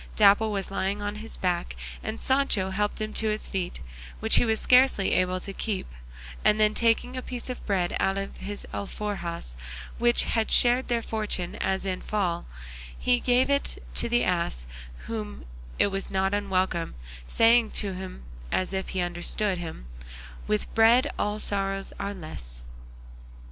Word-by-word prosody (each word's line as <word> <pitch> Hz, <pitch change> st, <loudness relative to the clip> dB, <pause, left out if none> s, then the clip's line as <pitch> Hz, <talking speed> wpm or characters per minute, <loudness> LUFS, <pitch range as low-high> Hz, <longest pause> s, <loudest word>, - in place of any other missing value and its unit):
Dapple 215 Hz, -, +5 dB
was 195 Hz, -2 st, -2 dB
lying 195 Hz, +1 st, -1 dB
on 205 Hz, 0 st, -2 dB
his 225 Hz, +1 st, -6 dB
back, 175 Hz, -2 st, -1 dB, 0.3 s
and 220 Hz, +1 st, -4 dB
Sancho 260 Hz, -8 st, +1 dB
helped 205 Hz, +2 st, -1 dB
him 215 Hz, 0 st, -3 dB
to 220 Hz, -, -1 dB
his 215 Hz, 0 st, -1 dB
feet, 185 Hz, -, -3 dB, 0.4 s
which -, -, +3 dB
he -, -, +4 dB
was 220 Hz, -1 st, +1 dB
scarcely 250 Hz, -6 st, +5 dB
able 185 Hz, 0 st, +2 dB
to 195 Hz, +2 st, -6 dB
keep; 205 Hz, -1 st, -2 dB, 0.6 s
and 210 Hz, -, +4 dB
then 215 Hz, 0 st, +4 dB
taking 235 Hz, +3 st, +2 dB
a 255 Hz, -, -3 dB
piece 250 Hz, 0 st, -5 dB
of 250 Hz, -, -7 dB
bread 185 Hz, -4 st, +1 dB
out 195 Hz, 0 st, +1 dB
of 195 Hz, 0 st, -4 dB
his 200 Hz, +2 st, -6 dB
alforjas 190 Hz, -, -4 dB, 0.4 s
which 240 Hz, 0 st, +4 dB
had 225 Hz, -1 st, 0 dB
shared 245 Hz, +1 st, +5 dB
their 235 Hz, -2 st, 0 dB
fortunes 210 Hz, -6 st, -2 dB, 0.3 s
in 185 Hz, -1 st, -1 dB
the -, -, -13 dB
fall, 185 Hz, -, -1 dB, 0.5 s
he 245 Hz, -1 st, +2 dB
gave 250 Hz, +1 st, +3 dB
it 280 Hz, 0 st, 0 dB, 0.2 s
to -, -, -1 dB
the 240 Hz, +1 st, +3 dB
ass, 170 Hz, -, 0 dB
to -, -, -14 dB
whom 210 Hz, -, -5 dB, 0.3 s
it 200 Hz, -, +3 dB
was 195 Hz, 0 st, -3 dB
not 190 Hz, +1 st, +1 dB
unwelcome, 185 Hz, -, 0 dB, 0.3 s
saying 230 Hz, -, +5 dB
to 200 Hz, -2 st, -2 dB
him 185 Hz, -, -7 dB, 0.3 s
as 185 Hz, +1 st, 0 dB
if 190 Hz, 0 st, -2 dB
he 185 Hz, -, -1 dB
understood 175 Hz, +3 st, 0 dB
him, 160 Hz, -, -6 dB, 0.6 s
"With 105 Hz, -, -1 dB
bread 235 Hz, +5 st, +5 dB
all 210 Hz, 0 st, 0 dB
sorrows 195 Hz, -2 st, -1 dB
are 200 Hz, 0 st, -3 dB
less." -, -, -8 dB
200 Hz, 165 wpm, -27 LUFS, 185-225 Hz, 0.6 s, Dapple